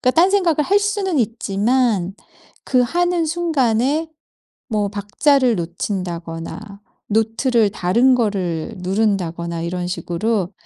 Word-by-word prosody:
그러니깐 255 - +2
딴 355 +4 +5
생각을 350 -7 +2
할 395 +7 +3
수는 405 -5 -1
있지만 220 -3 0 0.5
그 255 - +2
하는 350 +6 +1
순간에 305 -2 0 0.6
뭐 210 -4 0
박자를 230 +5 +2
놓친다거나 170 0 -4 0.5
노트를 225 +1 +2
다른 235 +8 +3
거를 190 -9 -1
누른다거나 180 -4 -1
이런 175 +1 -3
식으로 190 +2 -2
220 Hz, 260 characters per minute, -20 LUFS, 185-275 Hz, 0.6 s, 딴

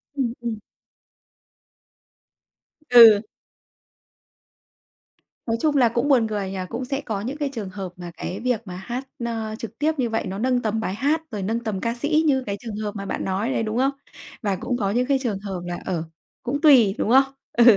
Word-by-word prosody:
Ừm, 255 -5 0
ừm. 235 -2 -3 2.3
Ừ. 230 -4 +9 2.2
Nói 230 -1 0
chung 300 +3 +1
là 245 -3 +5
cũng 235 +4 0
buồn 250 -6 +4
cười 205 -3 -3
nhỉ, 195 - -5
cũng 250 +2 -4
sẽ 275 +2 -2
có 215 -7 -3
những 260 +7 -4
cái 290 -2 -1
trường 215 -6 -5
hợp 185 -2 -6
mà 175 -1 -8
cái 185 +4 -4
việc 245 -1 0
mà 180 - -6
hát, 240 +8 -5 0.2
ờ, 225 -2 -3
trực 230 0 -7
tiếp 305 +2 +2
như 250 -3 0
vậy 225 0 -1
nó 190 +1 -4
nâng 250 +1 +1
tầm 220 -1 -1
bài 195 -3 -2
hát 295 +7 +1
rồi 205 -3 -4
nâng 225 +4 -1
tầm 215 -5 -4
ca 230 0 0
sĩ 305 +5 +1
như 265 -4 +2
cái 200 -1 -3
trường 225 -3 -6
hợp 210 0 -4
mà 200 -1 -5
bạn - - -3
nói 195 +6 -1
đấy, 225 - 0
đúng 215 +1 -2
không? 265 +2 +3 0.5
Và 200 -4 0
cũng 245 +6 -2
có 200 -4 0
những 245 +4 +1
cái 275 -1 +2
trường 220 -7 -2
hợp 195 -3 -5
là 175 0 -4
ờ, 175 -4 -1 0.4
cũng 280 +4 -2
tùy, 250 - +6
đúng - - -1
không? 265 +3 +7 0.3
Ừ. 240 - +5
230 Hz, 205 wpm, -23 LUFS, 200-255 Hz, 2.3 s, Ừ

